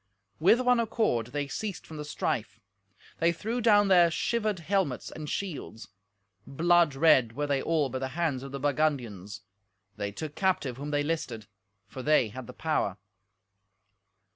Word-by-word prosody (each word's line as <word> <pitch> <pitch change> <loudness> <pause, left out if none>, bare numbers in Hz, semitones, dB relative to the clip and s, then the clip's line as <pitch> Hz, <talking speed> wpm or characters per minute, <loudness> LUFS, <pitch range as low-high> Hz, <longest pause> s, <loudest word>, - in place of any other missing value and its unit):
With 190 +9 +5
one 250 -1 +3
accord 215 - 0
they 145 +3 -3
ceased 200 +6 -5
from 160 - -9
the 150 - -5
strife. 110 -7 -3 0.6
They 170 +1 +3
threw 225 +8 -3
down 205 -3 +5
their 175 -3 +6
shivered 215 +4 -1
helmets 175 -5 -1
and 150 -1 -7
shields. 165 - -5 0.6
Blood 170 0 +3
red 135 -6 +4
were 145 +2 -1
they 140 -2 0
all 160 -4 +1
by 130 0 -4
the 130 - -2
hands 155 -7 0
of 135 0 -8
the 140 - -5
Burgundians. 130 -9 -1 0.6
They 100 -1 -3
took 150 +8 -6
captive 165 -10 0
whom 145 +2 -5
they 145 0 +1
listed, 135 -8 -3 0.4
for 130 +6 -8
they 145 -5 +3
had 130 +2 -8
the 125 - -9
power. 150 - -1
150 Hz, 160 wpm, -28 LUFS, 130-175 Hz, 0.6 s, their